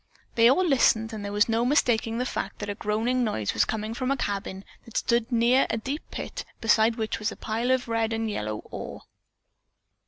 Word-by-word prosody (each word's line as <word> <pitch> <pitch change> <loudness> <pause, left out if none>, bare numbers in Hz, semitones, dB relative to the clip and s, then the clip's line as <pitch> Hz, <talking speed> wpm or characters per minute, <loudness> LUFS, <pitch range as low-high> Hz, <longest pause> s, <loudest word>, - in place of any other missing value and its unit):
They 230 0 +6
all 365 +8 +3
listened 230 -7 +3
and 215 -2 -5
there 200 - -4
was 210 0 +3
no 230 0 +1
mistaking 235 -4 +2
the 250 - -1
fact - - -4
that 205 -1 -4
a - - -2
groaning 225 +5 0
noise 110 - -1
was - - +3
coming 220 0 -3
from 255 +2 -2
a 275 - +1
cabin 195 -3 -3 0.2
that 230 - -6
stood 235 0 +1
near 240 +3 +4
a 230 - 0
deep 270 +7 -4
pit - - -5 0.2
beside 225 0 +3
which 220 -2 -2
was 215 0 -1
a - - -7
pile 230 +3 -2
of 260 -1 +2
red 225 -1 0
and 225 0 -1
yellow 110 - -3
ore. - - -7
225 Hz, 210 wpm, -26 LUFS, 215-245 Hz, 0.2 s, They